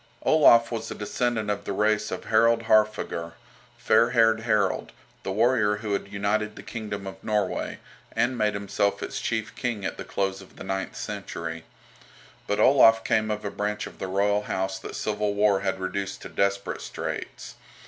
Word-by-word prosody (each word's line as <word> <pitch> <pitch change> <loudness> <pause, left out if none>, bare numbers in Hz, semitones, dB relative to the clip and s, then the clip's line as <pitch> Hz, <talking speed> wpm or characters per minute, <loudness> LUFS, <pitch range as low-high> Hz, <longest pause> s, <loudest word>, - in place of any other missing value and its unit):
Olaf 120 -7 +6
was 115 -1 -4
a - - -5
descendant 110 0 -1
of 100 0 -3
the - - -2
race 105 +1 +1
of - - -5
Harold 115 +1 +3
Haarfager, 105 -6 +1 0.4
"Fair 115 - +4
haired 115 -2 +4
Harold," 105 -4 0 0.3
the - - -4
warrior 110 0 +3
who 105 -1 -3
had 100 0 -3
united 105 +1 -1
the - - -10
kingdom 105 -4 -5
of 95 - -9
Norway, 105 -3 -1 0.4
and 125 +2 +1
made 105 -3 +1
himself 100 0 -1
its - - -4
chief 110 -1 -2
king 115 -5 -3
at - - -3
the - - -5
close 95 0 -2
of 95 - -16
the - - -9
ninth 95 0 -3
century. 80 -1 -5 0.8
But 105 - 0
Olaf 115 -4 +6
came 110 0 +1
of 105 0 -3
a 100 - -2
branch 105 0 -2
of - - -11
the 95 - -3
royal 100 +2 +1
house 95 -2 -2
that - - -8
civil 105 -1 -1
war 100 -1 +3
had 95 0 -2
reduced 95 +1 -4
to - - -7
desperate 100 0 -1
straits. - - -6
105 Hz, 180 wpm, -26 LUFS, 100-110 Hz, 0.8 s, Olaf